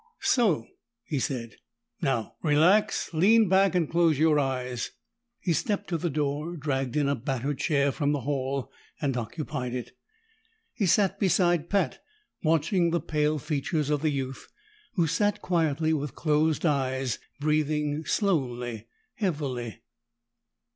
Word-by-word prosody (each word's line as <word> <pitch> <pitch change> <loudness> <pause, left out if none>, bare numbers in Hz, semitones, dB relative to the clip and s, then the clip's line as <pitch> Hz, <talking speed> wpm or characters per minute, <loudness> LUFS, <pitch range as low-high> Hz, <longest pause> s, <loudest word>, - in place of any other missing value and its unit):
"So!" 205 - +3 0.4
he 145 - -2
said. 120 -3 -3 0.4
"Now 135 -8 -1
relax. 170 +7 +3
Lean 210 +7 +5
back 190 +1 +4
and 170 -4 +2
close 165 -2 +3
your 155 0 +4
eyes." 125 -3 -2 0.5
He 175 - 0
stepped 205 - -1
to 170 - 0
the 175 - -1
door, 150 +3 -2
dragged 135 -2 -2
in 145 -2 +2
a 140 - +2
battered 135 +2 -2
chair 140 -2 +2
from 145 +2 0
the 145 -2 -1
hall, 135 0 -2 0.3
and 140 -4 -1
occupied 125 +1 -4
it. 125 - -5 0.8
He 205 -7 0
sat 195 +1 +3
beside 175 -3 +2
Pat, 200 -1 0 0.4
watching 165 +2 +2
the 170 +1 +1
pale 150 -1 0
features 150 +1 -1
of 145 -1 +1
the 155 - +2
youth, 135 -2 -4 0.5
who 175 -5 +3
sat 205 +6 +1
quietly 160 -2 +1
with 145 -3 -3
closed 155 +1 +1
eyes, 130 -4 0 0.2
breathing 150 0 0
slowly, 125 - -1 0.3
heavily. 135 - -3
150 Hz, 135 wpm, -27 LUFS, 135-170 Hz, 0.8 s, Lean